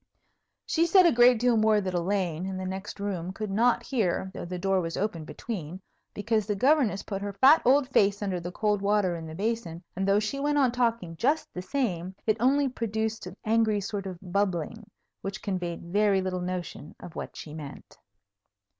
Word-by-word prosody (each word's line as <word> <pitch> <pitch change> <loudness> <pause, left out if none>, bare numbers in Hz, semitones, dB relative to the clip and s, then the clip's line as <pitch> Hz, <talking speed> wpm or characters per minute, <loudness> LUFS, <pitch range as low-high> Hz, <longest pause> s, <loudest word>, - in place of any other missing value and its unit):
She 335 +1 +2
said 370 +1 +6
a 340 - +6
great 240 +1 +6
deal 245 -1 +3
more 215 -1 +4
that 190 -2 -3
Elaine, 180 -1 -1
in 190 -1 -4
the 185 - -4
next 190 +2 -6
room, 185 -3 -3
could 210 +1 -5
not 235 +3 +2
hear 190 -6 -1
(though - - -6
the 180 +1 -5
door 190 +1 +1
was 165 -1 -4
open 180 -6 -2
between), 185 -4 -6 0.4
because 215 0 0
the 210 - 0
Governess 255 -3 +2
put 195 -1 -5
her 200 0 -4
fat 270 +11 +6
old 265 +2 +4
face 205 -5 +2
under 190 -3 -1
the 175 +1 -6
cold 210 +1 0
water 200 -3 +2
in 165 -1 -7
the 160 - -8
basin, 205 -4 -3
and, 190 +1 -1
though 200 +1 +4
she 215 +6 -3
went 290 +1 +1
on 265 -4 +4
talking 230 -8 -1
just 295 - 0
the 180 - -5
same, 185 -6 -2
it 215 0 +2
only 275 +4 +3
produced 220 -4 -3
an 180 +2 -10
angry 220 -1 +2
sort 200 0 -4
of 185 -2 -6
bubbling, 200 +2 -2 0.3
which 195 0 -6
conveyed 180 -4 -3
very 205 -1 +3
little 185 -1 -2
notion 180 -4 -5
of 170 - -11
what - - -6
she 150 - -8
meant. 150 -3 -10
200 Hz, 200 wpm, -27 LUFS, 185-230 Hz, 0.4 s, said